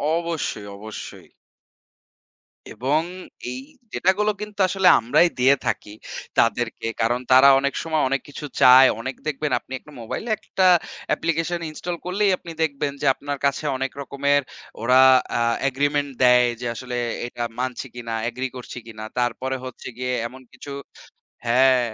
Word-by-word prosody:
অবশ্যই, 165 -11 -3
অবশ্যই। 110 +1 -9 1.4
এবং 145 +5 +1 0.5
এই 255 - -5 0.3
ডেটা 185 - +3
গুলো 210 0 +3
কিন্তু 210 0 -8
আসলে 190 0 +2
আমরাই 120 +9 +4
দিয়ে 130 +3 +6
থাকি 105 - -2 0.5
তাদেরকে 115 0 0
কারণ 120 +2 +1
তারা 130 +2 +8
অনেক 140 0 -1
সময় 160 -2 0
অনেক 135 0 0
কিছু 145 +1 -7 0.2
চায় 130 +1 +9
অনেক 130 +2 -4
দেখবেন 150 -1 -2
আপনি 130 - -12
একটা 150 - -17
মোবাইলে 165 - -5
একটা 190 -3 -1 0.4
অ্যাপ্লিকেশন 165 +1 0
ইনস্টল 170 +3 -5
করলেই 195 +2 +2
আপনি 170 - -10
দেখবেন 145 -2 -1
যে - - -2
আপনার 145 +1 -5
কাছে 140 +2 0
অনেক 135 +1 -2
রকমের 140 +1 +1 0.4
ওরা 125 +2 +5 0.4
আ - - +1 0.3
এগ্রিমেন্ট 145 +1 0
দেয় 125 0 +6
যে 120 - -2
আসলে 125 +1 -5 0.3
এটা 120 0 -5 0.2
মানছি 130 +1 -3
কিনা 115 -1 -5 0.2
এগ্রি 125 +2 -3
করছি 125 0 -8
কিনা। 110 -1 -9 0.2
তারপরে 125 +2 -1
হচ্ছে 130 - -8
গিয়ে 125 0 -2
এমন 130 +2 -13
কিছু 145 - -10 0.8
হ্যাঁ 130 +2 +5
135 Hz, 145 wpm, -23 LUFS, 125-155 Hz, 1.4 s, চায়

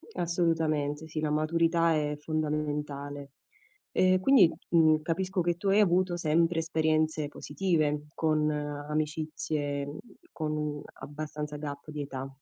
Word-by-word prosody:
Assolutamente, 160 -3 0
sì. 160 0 -4
La 155 -1 0
maturità 165 +2 +2
è 150 -1 0
fondamentale. 150 -2 -3 0.6
E 185 0 +4
quindi, 190 -5 +6 0.2
mhmm, 160 -2 +5
capisco 185 +4 -1
che 175 0 +1
tu 195 - -4
hai 195 +2 +5
avuto 180 -1 +2
sempre 165 +1 +2
esperienze 155 -2 +1
positive, 150 -1 -1
con 155 -1 +2
amicizie, 150 -1 -2 0.4
con 150 -2 -3 0.2
abbastanza 150 +1 -6
gap 145 0 -7
di 150 -1 -4
età. 135 -1 -5
155 Hz, 115 wpm, -29 LUFS, 150-165 Hz, 0.6 s, quindi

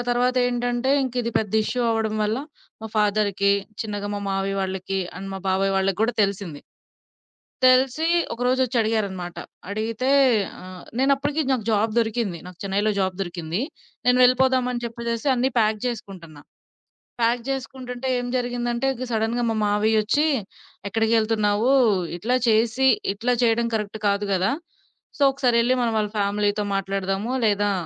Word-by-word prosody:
తర్వాత 245 +1 +1
ఏంటంటే 245 +1 -1
ఇంక 255 -2 -3
ఇది 235 -1 -2
పెద్ద 210 -3 -3
ఇష్యూ 250 - -2
అవ్వడం 220 -1 0
వల్ల 215 +3 0 0.4
మా - - -4
ఫాదర్‌‌కి 205 -1 +2 0.3
చిన్నగా 205 -2 -4
మా 205 - -3
మామయ్య 195 0 -1
వాళ్ళకి 190 0 -3 0.2
అండ్ 195 0 -6
మా - - -4
బాబాయ్ 195 +1 +1
వాళ్ళకి 195 -1 0
గూడా 230 +2 +2
తెలిసింది. 195 -7 -3 1.0
తెలిసి 255 +4 +4 0.3
ఒకరోజొచ్చి 250 +1 0
అడిగారన్నమాట 200 -6 -2 0.3
అడిగితే, 220 +4 -2 0.5
ఆహ్, 185 -1 -10 0.2
నేను 270 +2 +4
అప్పడికి 290 +3 -1
నాకు 245 -5 -1
జాబ్ 215 +1 +1
దొరికింది. 220 -5 -1
నాకు 180 -1 -12
చెన్నైలో 200 +2 0
జాబ్ 190 -1 0
దొరికింది. 175 0 -3 0.5
నేను 250 0 +4
వెళ్ళిపోదామని 250 -1 +3
జెప్పేసేసి 235 +2 -3
అన్ని 255 +1 +1
ప్యాక్ 215 -1 +2
జేసుకుంటున్నా. 180 -10 -7 0.8
ప్యాక్ 235 +1 +2
జేసుకుంటుంటే, 260 -1 -5
ఏం 245 - -4
జరిగిందంటే 245 0 -1 0.2
సడెన్‌గా 225 +2 0
మా 225 - -1
మామయ్యొచ్చి 215 +6 +2 0.6
ఎక్కడికెళ్తున్నావు 220 +1 +2 0.5
ఇట్లా 230 +8 0
చేసి 225 +4 +3 0.3
ఇట్లా 235 +5 0
చేయడం 235 0 +2
కరెక్ట్ 210 -1 -2
కాదు 200 +1 +1
గదా! 190 +1 +1 0.7
సో, - - -9
ఒకసారెళ్లి 245 -2 +2
వాళ్ళ 220 -3 +1
ఫ్యామిలీతో 205 +1 0
మాట్లాడదాము. 195 +3 -2
లేదా 205 -1 +2
220 Hz, 130 wpm, -23 LUFS, 200-245 Hz, 1.0 s, తెలిసి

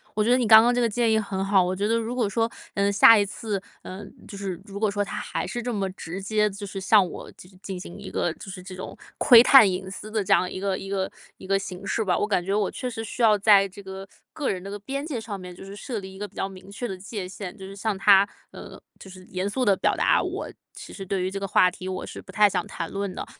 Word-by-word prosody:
我 210 - +2
觉 220 - 0
得 - - +6
你 250 - +1
刚 220 0 +9
刚 240 +2 +3
这 245 - +1
个 235 - +2
建 235 +1 +1
议 220 - +3
很 195 -3 -2
好， 195 -1 +4
我 180 +1 -1
觉 200 +2 -1
得 225 - +2
如 230 +1 -3
果 245 -4 0
说， 225 +3 0 0.2
呃， 200 0 +1
下 220 +3 +8
一 205 - +2
次， 205 0 -4 0.2
呃， 190 +2 -8 0.2
就 200 - -9
是 190 -4 -5
如 200 -2 -9
果 210 0 +1
说 205 0 -1
他 205 - -3
还 - - -4
是 240 +6 -4
这 245 - -2
么 195 -2 -1
直 185 0 -7
接 210 +1 +1
就 205 +1 -8
是 195 0 -6
向 195 -1 +5
我 - - -9
进 185 +1 -16
进 190 -2 -5
行 175 - -9
一 - - -8
个 175 - -1
就 195 - -11
是 185 -1 -8
这 185 0 -9
种 185 - -8 0.2
窥 240 -4 +8
探 250 -4 +8
隐 190 +1 -4
私 210 +2 -8
的 215 -1 0
这 195 - +2
样 180 - +2
一 - - -5
个 195 -1 -1
一 195 - -8
个 195 -1 -1 0.3
一 - - -12
个 195 0 +3
形 195 0 -7
式 225 - 0
吧， 180 -4 +1
我 205 - 0
感 195 -4 +1
觉 195 +2 -2
我 205 -1 +1
确 255 - -5
实 225 -2 -5
需 225 +2 -6
要 215 -2 +5
在 200 -1 +6
这 195 +2 -12
个， 190 0 -8 0.3
个 295 - -2
人 185 - -2
的 195 - -8
个 205 - -5
边 275 +7 -4
界 275 -8 -4
上 210 -3 -6
面， 180 -1 -9
就 - - -11
是 195 +1 -9
设 225 +2 -5
立 190 -1 -10
一 - - -12
个 205 - -4
比 200 - -26
较 190 - -2
明 190 0 -13
确 200 +5 -6
的 195 -5 -4
界 200 +1 -6
限。 190 0 -8
就 190 - -9
是 195 - -9
向 200 0 -2
他， 195 0 +6 0.2
呃， - - -11 0.2
就 190 - -12
是 185 0 -12
严 185 +2 -2
肃 255 +5 -1
地 205 - +5
表 - - +1
达， - - +3
我 - - -4 0.2
其 - - -11
实 195 - -7
对 190 0 -2
于 185 - -2
这 195 - -4
个 195 - -3
话 185 -1 +4
题 185 +1 -9
我 185 0 -4
是 - - -9
不 - - -13
太 210 -1 +5
想 - - -2
谈 165 - -5
论 200 -1 -3
的。 - - -6
200 Hz, 320 characters per minute, -25 LUFS, 190-215 Hz, 0.3 s, 刚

